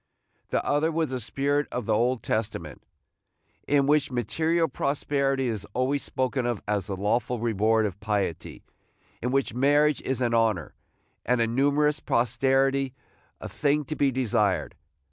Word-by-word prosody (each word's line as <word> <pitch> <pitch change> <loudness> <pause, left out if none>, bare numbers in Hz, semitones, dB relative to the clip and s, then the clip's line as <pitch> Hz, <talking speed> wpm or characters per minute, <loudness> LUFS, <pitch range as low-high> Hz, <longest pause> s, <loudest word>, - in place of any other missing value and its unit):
The - - -1
other 150 +3 +1
was 160 -3 -1
the 130 - -2
spirit 140 +4 -1
of 125 -3 -3
the - - +1
Old 120 +3 +1
Testament, 110 -1 -3 0.9
in 140 -1 +3
which 145 0 +2
material 160 +7 0
prosperity 140 -1 -1
is 105 -4 -3
always 135 +3 +1
spoken 130 -1 -2
of 120 -4 -1
as 105 -3 -1
the 95 - -4
lawful 115 +5 0
reward 110 -1 +2
of 100 -2 -4
piety, 105 -6 -3 0.6
in 125 - -1
which 135 -3 0
marriage 145 +3 +3
is 130 -1 -2
an 120 -2 0
honor, 110 -9 +1 0.5
and 125 0 +1
a 115 - +3
numerous 145 +5 +2
posterity 135 +3 +1 0.4
a - - -6
thing 145 +1 0
to 155 - -4
be 140 -1 +2
desired. 105 - 0
130 Hz, 150 wpm, -26 LUFS, 110-140 Hz, 0.9 s, in